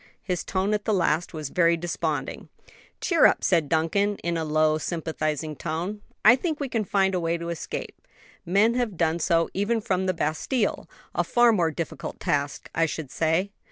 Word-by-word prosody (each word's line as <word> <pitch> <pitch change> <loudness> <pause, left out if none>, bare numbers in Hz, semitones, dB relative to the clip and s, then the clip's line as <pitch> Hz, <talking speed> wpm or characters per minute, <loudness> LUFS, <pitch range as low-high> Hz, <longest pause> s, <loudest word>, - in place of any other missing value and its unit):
His 180 -2 -2
tone 195 +2 -1
at 210 -1 -1
the 215 - +2
last 170 -2 +1
was 155 -4 -5
very 170 0 +3
desponding. 160 -4 -3 0.5
"Cheer 335 -4 +5
up," - - 0
said 165 -6 +2
Duncan, 185 +6 +1
in 170 0 -1
a 165 - -1
low, 155 0 +2
sympathizing 155 -2 -3
tone, 170 +8 -4 0.2
"I 230 +3 +9
think 310 +3 -3
we 280 -2 -3
can 225 -4 -1
find 195 -1 +2
a 180 - +1
way 170 0 0
to 170 0 -5
escape; 170 - -5 0.5
men 200 +6 +3
have 240 -7 -1
done 165 0 +1
so 165 0 +2
even 210 +4 0
from 190 -4 -1
the 185 - +2
Bastile 195 - -1 0.2
a - - +1
far 240 -1 +4
more 175 -7 +2
difficult 160 +1 -5
task, 145 -1 -1
I 165 0 +2
should 150 -4 -6
say." 165 +5 0
170 Hz, 185 wpm, -25 LUFS, 160-205 Hz, 0.5 s, I